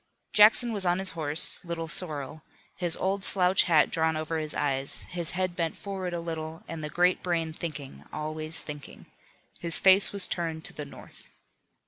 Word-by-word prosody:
Jackson 225 +3 +6
was 200 -2 0
on 175 -1 +2
his 190 0 0
horse, 160 +1 +2
Little 170 -1 -5
Sorrel, 155 -3 -2 0.3
his 175 -3 +1
old 195 +1 -1
slouch 185 -1 +3
hat 165 -4 +3
drawn 160 0 +1
down 155 - -2
over 160 +1 -3
his 155 -1 -4
eyes, 135 -1 0
his 170 -2 -1
head 185 -1 -1
bent 165 -2 -2
forward 190 -3 -5
a 170 - -3
little, 160 -1 -6
and 165 -2 -6
the 150 - -4
great 180 +4 +2
brain 165 -3 -2
thinking, 145 - -7
always 155 +1 -3
thinking. 145 -1 -10 0.5
His 170 -1 -1
face 190 +1 +5
was 200 -2 +3
turned 165 -2 -3
to - - -4
the 150 - -7
North. 140 - -15
165 Hz, 180 wpm, -27 LUFS, 155-180 Hz, 0.5 s, Jackson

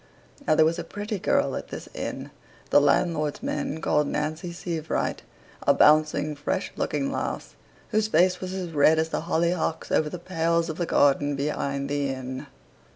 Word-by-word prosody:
Now, 155 - +4
there 155 - +5
was 165 +2 +1
a - - -3
pretty 205 0 -5
girl - - +1
at - - -5
this - - -8
inn, - - -5 0.4
the - - +7
landlord's 155 -4 +1
men 155 - -2
called 150 -2 +2
Nancy 155 +4 -3
Sievewright, 165 -2 -3 0.4
a - - +3
bouncing, 155 0 +4
fresh 145 - -2
looking 140 -2 -1
lass, - - -4 0.4
whose 215 0 +1
face 180 -3 +3
was 185 -1 -4
as 185 -3 -4
red 155 +1 +4
as 160 0 +1
the - - -2
hollyhocks 170 -1 0
over 155 - +2
the 180 - -5
pales 170 -1 0
of 160 - -4
the 175 - -1
garden 145 0 +3
behind 140 -1 -2
the 145 0 -1
inn. 130 0 -5
155 Hz, 170 wpm, -26 LUFS, 145-170 Hz, 0.4 s, the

